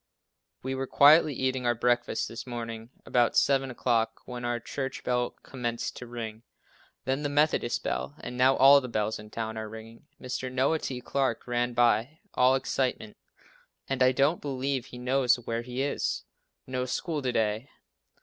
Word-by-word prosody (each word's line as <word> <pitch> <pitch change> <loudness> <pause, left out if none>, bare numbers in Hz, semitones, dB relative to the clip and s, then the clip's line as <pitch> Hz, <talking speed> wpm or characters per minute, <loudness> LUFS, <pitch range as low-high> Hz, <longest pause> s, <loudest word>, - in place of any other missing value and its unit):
We 130 +1 -2
were 135 0 -3
quietly 150 +1 +6
eating 130 -1 -1
our 120 - +2
breakfast 120 +1 +1
this 115 +3 -8
morning 115 -2 -6 0.2
about 120 -2 +2
7 135 -1 +3
o'clock, 115 -2 0
when 125 -1 -7
our 120 0 -1
church 135 +3 -5
bell 125 -1 0
commenced 120 -3 -4
to 125 - -8
ring, 115 -2 -6 0.6
then 135 +2 0
the 145 - -1
Methodist 145 -4 +1
bell, 145 - -3
and 125 - -7
now 130 +2 +4
all 140 +2 +8
the 125 - -5
bells 110 -2 -1
in 105 0 -11
town 110 0 -4
are 110 -1 -5
ringing. 110 +4 -11
Mr. 130 0 -4
Noah 130 +5 +2
T. 125 -4 -4
Clarke 135 +1 -1
ran 120 0 -1
by, 120 +4 +2 0.2
all 130 +1 +4
excitement, 130 -5 -2 0.7
and 135 -1 -2
I 130 0 +6
don't 140 +6 +2
believe 135 -2 -2
he 125 - -10
knows 125 0 +2
where 115 -1 -4
he 125 +2 -3
is. 140 - -1 0.4
No 130 0 -2
school 150 +4 -2
to 130 -2 -1
day. 110 +3 -1
125 Hz, 170 wpm, -28 LUFS, 120-135 Hz, 0.7 s, all